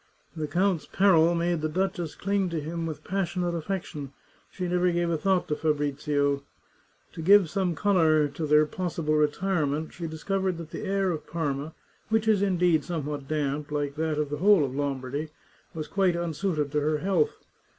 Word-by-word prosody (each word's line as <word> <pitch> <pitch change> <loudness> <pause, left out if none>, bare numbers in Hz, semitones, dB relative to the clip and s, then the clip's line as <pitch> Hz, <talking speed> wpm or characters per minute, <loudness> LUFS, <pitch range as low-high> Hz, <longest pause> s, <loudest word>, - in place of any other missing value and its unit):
The 155 -2 -3
count's 180 +2 +1
peril 175 -4 +4
made 170 -1 0
the 155 - -1
duchess 175 -1 -2
cling 195 -1 0
to 165 -1 -2
him 165 +2 -4
with 155 -2 -6
passionate 180 -2 -1
affection; 160 -5 -4 0.4
she 180 -2 -4
never 180 0 +2
gave 170 0 0
a - - +2
thought 190 +1 +1
to 150 - +1
Fabrizio. 145 -2 0 0.7
To - - -6
give 190 -1 +6
some 185 -4 0
colour 160 -7 +3
to 150 +2 -4
their 150 +1 +5
possible 165 -1 -2
retirement, 155 0 0
she 170 -1 -5
discovered 185 +3 -2
that 165 -1 -8
the - - -5
air 195 -1 +1
of 155 -3 -5
Parma, 150 -2 -3 0.3
which 220 0 +1
is, 210 -3 +4
indeed, 180 -4 +2
somewhat 150 -5 -4
damp, 150 -1 -2
like 145 -1 -1
that 155 -1 -1
of 150 -1 -1
the 145 - -2
whole 190 -2 +5
of 130 - -5
Lombardy, 140 +1 -3 0.5
was 155 -2 -4
quite 190 -3 +2
unsuited 165 -3 -1
to 150 0 +1
her 150 +1 +1
health. 195 - +1
165 Hz, 175 wpm, -27 LUFS, 150-185 Hz, 0.7 s, give